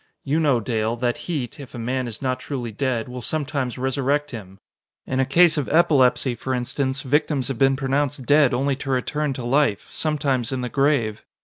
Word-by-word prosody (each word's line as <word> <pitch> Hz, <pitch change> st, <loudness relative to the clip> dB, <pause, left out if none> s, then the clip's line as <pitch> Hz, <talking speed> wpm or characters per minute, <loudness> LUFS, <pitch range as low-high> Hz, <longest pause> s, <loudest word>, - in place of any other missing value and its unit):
You 150 Hz, +3 st, 0 dB
know, 145 Hz, -6 st, +3 dB
Dale, 115 Hz, -1 st, -1 dB
that 120 Hz, 0 st, -1 dB
heat, 145 Hz, -6 st, -3 dB
if 135 Hz, -2 st, -10 dB
a -, -, -6 dB
man 125 Hz, +2 st, -2 dB
is 115 Hz, +2 st, -7 dB
not 130 Hz, -1 st, -1 dB
truly 125 Hz, -5 st, -5 dB
dead, 120 Hz, 0 st, -1 dB
will 125 Hz, 0 st, -7 dB
sometimes 140 Hz, -3 st, -2 dB
resurrect 135 Hz, +3 st, 0 dB
him. 95 Hz, -6 st, -9 dB, 0.5 s
In 130 Hz, -, -2 dB
a 135 Hz, -, +2 dB
case 165 Hz, +3 st, +5 dB
of 140 Hz, -, -3 dB
epilepsy, 140 Hz, -5 st, +3 dB
for 130 Hz, +2 st, -3 dB
instance, 130 Hz, +2 st, -2 dB
victims 145 Hz, 0 st, 0 dB
have 135 Hz, -, -4 dB
been 135 Hz, 0 st, +4 dB
pronounced 135 Hz, 0 st, -1 dB
dead 145 Hz, -1 st, +5 dB
only 135 Hz, +3 st, 0 dB
to 140 Hz, -, -6 dB
return 140 Hz, +3 st, 0 dB
to 125 Hz, -2 st, -6 dB
life 135 Hz, -4 st, +1 dB
sometimes 140 Hz, -5 st, -1 dB
in 130 Hz, -1 st, -2 dB
the 125 Hz, -, -3 dB
grave. 135 Hz, -7 st, +1 dB
130 Hz, 195 wpm, -23 LUFS, 125-145 Hz, 0.5 s, case